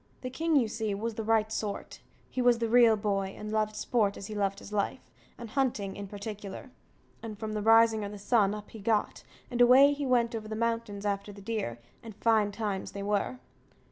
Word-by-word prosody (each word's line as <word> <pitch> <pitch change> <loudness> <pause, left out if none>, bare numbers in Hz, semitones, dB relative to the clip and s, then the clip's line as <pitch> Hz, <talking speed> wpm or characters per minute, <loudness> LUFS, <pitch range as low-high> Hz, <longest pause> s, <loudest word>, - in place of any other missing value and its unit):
The 255 - -5
king, 320 +4 0
you 255 -5 +4
see, 215 -1 -2
was 225 +3 -3
the 220 - -4
right 220 0 +2
sort; 210 -2 -4 0.3
he 255 - -3
was 245 -1 +4
the 230 0 -1
real 230 -1 +6
boy, 195 -2 -2
and 210 0 -6
loved 215 0 0
sport 210 -1 0
as 195 - -7
he 215 - -7
loved 200 -1 -1
his 205 - -11
life, 205 -1 -2 0.3
and 235 -2 -9
hunting 235 -8 -1
in 200 0 -6
particular; 205 +4 -7 0.5
and 220 -2 -7
from 215 0 -5
the 210 - -2
rising 225 0 +5
o' 200 - -4
the 205 - -8
sun, 205 0 +2
up 210 0 -10
he 220 - -10
got, 210 +1 0 0.3
and 245 0 0
away 265 +4 +7
he 285 -1 -3
went 240 -2 +2
over 220 -1 -5
the 220 - -4
mountains 230 -3 -2
after 200 0 -2
the 200 - -12
deer; 200 - -3 0.2
and 225 -3 -10
fine 215 -1 +2
times 200 -2 -4
they 200 - -5
were. 205 +5 -1
215 Hz, 215 wpm, -29 LUFS, 205-230 Hz, 0.5 s, away